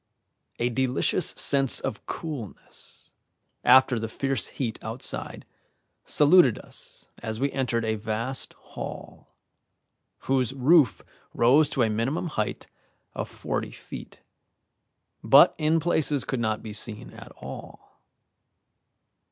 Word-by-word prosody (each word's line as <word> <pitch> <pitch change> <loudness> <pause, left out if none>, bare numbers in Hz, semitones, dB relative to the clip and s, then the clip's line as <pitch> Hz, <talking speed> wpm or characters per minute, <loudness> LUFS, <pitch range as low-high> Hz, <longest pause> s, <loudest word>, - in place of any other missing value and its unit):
A 120 - 0
delicious 130 +6 +1
sense 135 -2 +4
of 110 - -6
coolness, 145 - -9 0.5
after 130 -1 +5
the 115 - -3
fierce 135 +4 -2
heat 120 -5 -4
outside, - - -5 0.6
saluted 150 - +5
us - - -9 0.2
as 110 -1 -5
we 140 +1 0
entered 120 -4 -1
a 110 - 0
vast 110 +4 -2 0.2
hall, - - -9 0.9
whose 130 -1 0
roof 140 +1 +3 0.3
rose 140 +6 +4
to 130 - +1
a 110 - +1
minimum 130 +11 -2
height 110 -8 -3 0.5
of - - -5
forty - - -4
feet, - - -11 1.0
but - - +7
in 155 +2 +2
places 150 -4 0
could 130 - -3
not 110 -2 -1
be 110 - -7
seen 105 0 -6
at - - -12
all. - - -11
130 Hz, 115 wpm, -26 LUFS, 115-140 Hz, 1.0 s, but